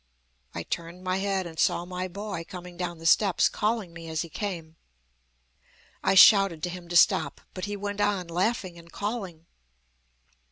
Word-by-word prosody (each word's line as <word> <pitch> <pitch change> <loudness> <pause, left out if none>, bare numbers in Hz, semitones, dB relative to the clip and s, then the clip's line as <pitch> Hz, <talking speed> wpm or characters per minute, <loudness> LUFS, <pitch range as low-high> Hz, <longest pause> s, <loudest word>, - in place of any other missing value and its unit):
I 85 - -3
turned 170 - -6
my 185 0 0
head 195 -1 -1
and 160 -2 -9
saw 175 - +2
my 180 +1 -4
boy 200 -1 -5
coming 180 -2 -9
down 175 -1 -4
the 165 - -12
steps, 190 +2 +4
calling 210 -5 -2
me 165 -1 -9
as 160 +1 -1
he 170 - -10
came. 165 -5 -5 1.3
I - - +3
shouted 195 -4 +7
to 180 - -1
him 175 -1 -9
to 175 - -4
stop, 155 -3 +3
but 185 - -4
he 205 0 -4
went 205 +1 -4
on, 200 -4 0
laughing 180 0 -1
and 170 0 -16
calling. 200 -6 -5
180 Hz, 170 wpm, -27 LUFS, 170-200 Hz, 1.3 s, shouted